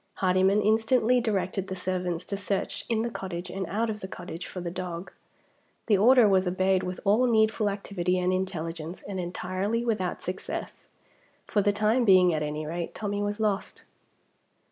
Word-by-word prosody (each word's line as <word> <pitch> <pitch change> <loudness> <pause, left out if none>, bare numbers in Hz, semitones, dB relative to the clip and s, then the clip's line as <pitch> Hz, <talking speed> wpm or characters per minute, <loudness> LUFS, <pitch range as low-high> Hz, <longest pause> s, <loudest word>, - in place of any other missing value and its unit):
Hardyman 190 +2 +3
instantly 225 +3 +3
directed 195 -3 -1
the 190 - -4
servants 180 -1 -2
to 200 - -3
search 200 0 -3
in 225 -1 +1
the 235 - -2
cottage 180 -3 -5
and 190 -1 -4
out 220 +5 0
of 215 -1 -3
the 190 - -6
cottage 175 -2 -7
for 185 - -7
the 175 -1 -4
dog. 180 0 -5 0.7
The 215 - +4
order 235 +3 +6
was 190 -2 +3
obeyed 185 +1 +2
with 180 -1 -4
all 220 +6 +4
needful 220 -2 +3
activity 185 -3 -1
and 180 0 +1
intelligence, 170 -2 -4
and 195 -2 -5
entirely 185 +6 -2
without 200 -6 -1
success. 185 +1 -6 0.6
For 205 - +1
the 205 +1 +3
time 215 +4 +2
being 185 -4 +6
at 155 - -1
any 150 +1 -3
rate, 170 +2 -4
Tommie 205 -1 -2
was 205 +1 -2
lost. 210 -2 -1
190 Hz, 170 wpm, -27 LUFS, 180-210 Hz, 0.7 s, order